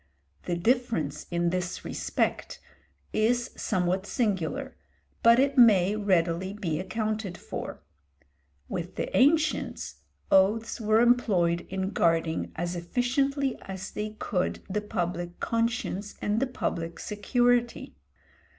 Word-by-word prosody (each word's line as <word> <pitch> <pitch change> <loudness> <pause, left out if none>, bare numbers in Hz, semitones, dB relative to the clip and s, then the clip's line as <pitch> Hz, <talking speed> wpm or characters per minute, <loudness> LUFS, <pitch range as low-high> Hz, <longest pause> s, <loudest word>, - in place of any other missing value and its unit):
The 175 - 0
difference 175 - 0
in 170 0 0
this 180 -1 -3
respect - - -2 0.5
is 235 +3 +1
somewhat 185 -1 -1
singular, 235 - -1 0.5
but 230 0 +7
it 275 +1 +3
may 205 -4 +6
readily 185 -2 +1
be 170 -7 -2
accounted 215 0 -3
for. - - -7 0.8
With 175 +1 -5
the - - -3
ancients, 310 +4 +2 0.3
oaths 215 +5 +3
were 215 +1 +4
employed 195 -9 +2
in 190 +1 -2
guarding 165 -3 +1
as 175 +2 -3
efficiently 260 +9 0
as 190 0 -7
they 215 0 -4
could 180 -4 -2
the 210 +2 -2
public 175 -4 -3
conscience 230 -3 -1
and 210 +2 0
the 270 - +1
public 170 -9 -3
security. 240 +3 0
205 Hz, 115 wpm, -28 LUFS, 175-235 Hz, 0.8 s, but